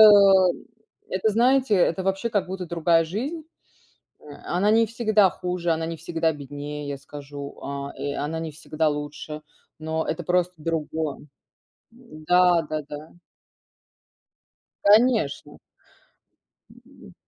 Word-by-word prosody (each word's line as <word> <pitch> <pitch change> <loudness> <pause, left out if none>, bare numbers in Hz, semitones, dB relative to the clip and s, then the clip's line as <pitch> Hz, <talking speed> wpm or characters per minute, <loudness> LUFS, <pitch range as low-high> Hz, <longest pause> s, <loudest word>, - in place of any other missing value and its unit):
м, 195 -4 +7 0.4
это 190 +4 0
знаете, 250 +1 +3
это 185 0 +2
вообще 195 +4 -1
как 205 -4 0
будто 185 -1 -5
другая 165 0 +2
жизнь. 270 - -4 0.8
Э, - - -20 0.2
она 195 +5 +1
не 225 +1 +5
всегда 215 -4 +3
хуже, 180 -1 -2
она 160 0 0
не 165 0 -5
всегда 165 0 0
беднее, 145 0 -7
я 140 -1 -4
скажу, 140 0 -9
а, 140 0 -5
э, 140 +1 -3
она 155 +3 -3
не 160 -1 -5
всегда 155 +1 -1
лучше, 150 +1 -5 0.4
но 160 0 -2
это 165 +2 -3
просто 180 +1 +1
другое. 160 -1 -3 0.8
М, 230 -11 -14
да-да-да. 155 -4 +1 1.7
Конечно. 215 - +3 1.1
М, - - -17
165 Hz, 120 wpm, -24 LUFS, 150-195 Hz, 1.7 s, м